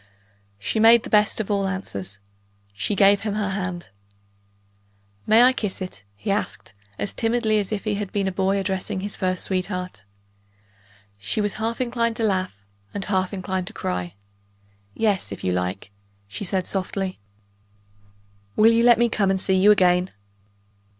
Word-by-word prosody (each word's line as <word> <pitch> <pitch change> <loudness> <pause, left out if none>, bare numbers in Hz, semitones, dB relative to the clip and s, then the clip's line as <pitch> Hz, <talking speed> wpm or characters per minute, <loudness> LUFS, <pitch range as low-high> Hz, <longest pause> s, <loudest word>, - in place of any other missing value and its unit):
She 100 - -2
made 230 +1 +7
the - - -8
best 210 0 +3
of 215 -1 -2
all 200 -1 +1
answers 100 - -4 0.6
she 100 - -2
gave 200 +1 +5
him 210 -1 -2
her 205 -2 -1
hand. 180 - -4 1.4
"May 225 +2 +7
I 255 +1 +6
kiss 210 -6 -3
it?" 180 - -7
he 105 - -3
asked, 200 - -3 0.2
as - - -2
timidly 225 -2 +1
as 200 -1 -3
if 210 -2 -2
he 215 - -1
had 205 -1 -4
been 200 -2 0
a - - 0
boy 190 +1 +1
addressing 190 0 -2
his 205 +1 -4
first 185 -1 -1
sweetheart. 180 - -3 1.1
She 100 - -2
was 205 -1 0
half 230 +1 -1
inclined 235 -2 0
to 225 - -2
laugh, 185 - -1 0.3
and 200 - -3
half 185 -2 0
inclined 185 -2 -3
to 215 - -5
cry. 90 - -4 0.8
"Yes, 205 - 0
if 100 - -7
you 90 - +1
like," 90 +2 -3 0.4
she 105 - -6
said 185 0 -1
softly. 190 0 -3 1.4
"Will 220 +2 +6
you 230 0 +3
let 240 -1 +7
me 240 - +3
come 205 -4 +1
and 190 0 +1
see 190 - +1
you 190 +2 +5
again?" 180 -2 +4
195 Hz, 165 wpm, -23 LUFS, 185-215 Hz, 1.4 s, made